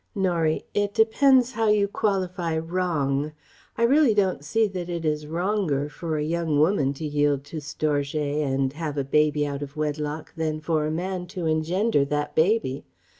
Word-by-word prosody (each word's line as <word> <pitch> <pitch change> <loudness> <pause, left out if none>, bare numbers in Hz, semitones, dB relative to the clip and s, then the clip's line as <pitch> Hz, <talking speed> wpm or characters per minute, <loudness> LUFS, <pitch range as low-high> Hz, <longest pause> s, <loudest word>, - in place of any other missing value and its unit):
Norie: 170 -5 0
"It 205 0 0
depends 255 +3 +4
how 225 -2 0
you 210 -1 +3
qualify 185 -5 -1
'wrong.' 160 -4 -1 0.4
I 230 - +1
really 265 -1 +4
don't 190 -8 +1
see 225 +9 +2
that 180 -3 -5
it 170 -2 -3
is 150 -1 -1
'wronger' 170 -4 -1
for 160 0 -4
a 150 - -1
young 160 -1 0
woman 150 -4 +3
to 155 - -5
yield 145 -2 +1
to 145 +3 -8
'storgé' 150 0 -1
and 135 -1 0
have 150 -2 -4
a 140 - +1
baby 150 +1 +2
out 140 -1 -4
of 145 +1 -7
wedlock 150 0 -3
than 155 -2 -2
for 155 -1 0
a - - -2
man 180 +2 -3
to 180 -2 -5
engender 160 +3 +1
that 145 +1 -2
baby. 160 -6 +1
160 Hz, 175 wpm, -25 LUFS, 150-190 Hz, 0.4 s, depends